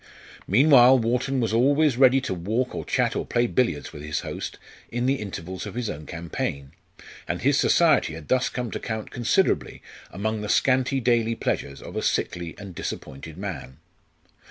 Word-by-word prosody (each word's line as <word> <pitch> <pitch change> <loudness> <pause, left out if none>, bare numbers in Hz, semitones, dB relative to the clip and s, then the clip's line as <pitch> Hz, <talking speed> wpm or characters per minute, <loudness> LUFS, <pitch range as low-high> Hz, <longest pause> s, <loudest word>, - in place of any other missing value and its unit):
Meanwhile, 130 - +6
Wharton 125 +3 0
was 115 -2 0
always 140 +4 +3
ready 130 +1 +5
to 130 - -3
walk 110 +9 -2
or - - -4
chat 125 -2 0
or - - -1
play 120 0 +1
billiards 115 - -1
with 75 - -9
his 75 0 -3
host - - -6 0.3
in 120 +1 -1
the 135 +2 +2
intervals 95 -2 -6
of - - -8
his 120 -4 -2
own 75 0 -9
campaign; 75 -5 -4 0.6
and - - -3
his - - +3
society 80 - +3
had 80 -2 -10
thus 130 0 +2
come 125 -3 -4
to - - -4
count 110 -1 -5
considerably 125 - 0 0.3
among 110 +3 -3
the 105 - -5
scanty 130 +2 +2
daily 115 -2 +1
pleasures 70 -9 -3
of - - -9
a - - -1
sickly 85 -2 -2
and 100 -2 -9
disappointed 75 0 -7
man. 85 -9 -6
115 Hz, 175 wpm, -25 LUFS, 85-125 Hz, 0.6 s, Meanwhile